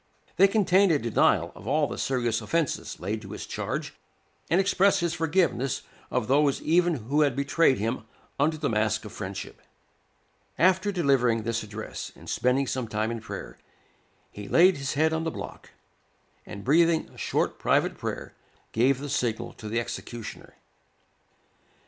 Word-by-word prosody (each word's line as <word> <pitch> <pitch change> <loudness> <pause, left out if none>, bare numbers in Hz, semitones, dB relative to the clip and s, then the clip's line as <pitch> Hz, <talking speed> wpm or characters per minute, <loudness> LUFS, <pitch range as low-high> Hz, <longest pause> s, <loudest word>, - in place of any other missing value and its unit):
They 195 - +7
contain 195 -1 +4
a 160 - +4
denial 115 -5 +2
of - - -12
all - - +2
the - - -5
serious 120 -4 0
offences 165 -4 -2
laid 105 +4 -3
to 100 -2 -9
his - - -6
charge, - - -4 0.6
and 175 - +3
express 195 0 +3
his 170 -2 0
forgiveness 165 -6 0 0.3
of 125 -3 -1
those 140 +1 +3
even 175 +1 +3
who 140 +5 0
had 140 -4 +2
betrayed 140 0 +3
him 110 +3 -2 0.3
under 155 +3 +2
the 155 -2 -1
mask 110 -1 0
of 105 - -8
friendship. 95 -1 -7 1.0
After 190 +4 +3
delivering 135 - +2
this 115 0 -1
address, 110 0 -7
and - - -15
spending 130 +2 +1
some 130 -2 -3
time 110 +1 -1
in 115 -1 -4
prayer, - - -8 0.7
he 105 -1 -8
laid 180 0 +5
his 135 0 -3
head 160 +2 +2
on 160 0 -1
the 165 - -1
block, - - -8 0.8
and 100 - -8
breathing 165 +3 +3
a - - -19
short - - -1
private - - +2
prayer, - - -5 0.4
gave 125 +4 +3
the 145 - -5
signal 125 -5 -2
to 110 - -8
the 115 +2 0
executioner. 120 -1 -7
135 Hz, 160 wpm, -27 LUFS, 115-165 Hz, 1.0 s, They